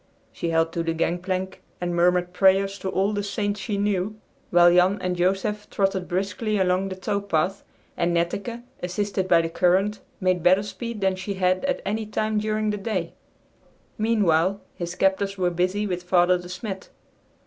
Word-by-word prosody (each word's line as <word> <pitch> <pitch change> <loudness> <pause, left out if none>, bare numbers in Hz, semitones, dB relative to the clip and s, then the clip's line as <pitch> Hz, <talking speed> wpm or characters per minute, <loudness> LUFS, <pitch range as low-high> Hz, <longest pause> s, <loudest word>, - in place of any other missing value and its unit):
She 170 - -3
held 165 0 +2
to 170 - -1
the 165 0 -1
gangplank 185 +3 -2 0.2
and 175 -1 -2
murmured 180 +1 +2
prayers 195 +1 +3
to 190 - -3
all 195 +2 +1
the 205 - -1
saints 205 +1 -2
she 210 -3 -3
knew, 200 0 0 0.3
while 175 0 +6
Jan 180 +3 +4
and 185 -1 -1
Joseph 195 +4 0
trotted 195 -2 0
briskly 200 +4 -1
along 185 0 +1
the 190 - -5
tow 200 +2 -2
path, 195 0 -1 0.3
and 170 0 +1
Netteke, 200 +8 -2 0.2
assisted 190 +1 -2
by 170 -2 +5
the 165 - -2
current, 190 +5 +2 0.2
made 185 -2 +1
better 185 +4 +4
speed 230 +1 -6
than 190 -1 +2
she 185 +2 -4
had 185 0 +1
at 275 - -1
any 215 +2 -2
time 215 0 0
during 215 0 0
the 210 - -2
day. 195 -5 -3 0.8
Meanwhile 200 -4 +2
his 175 0 -5
captors 195 +1 +1
were 180 -1 +1
busy 185 +4 0
with 180 -3 -2
Father 180 0 +3
De 180 0 -10
Smet. 190 +1 -6
190 Hz, 175 wpm, -24 LUFS, 180-205 Hz, 0.8 s, while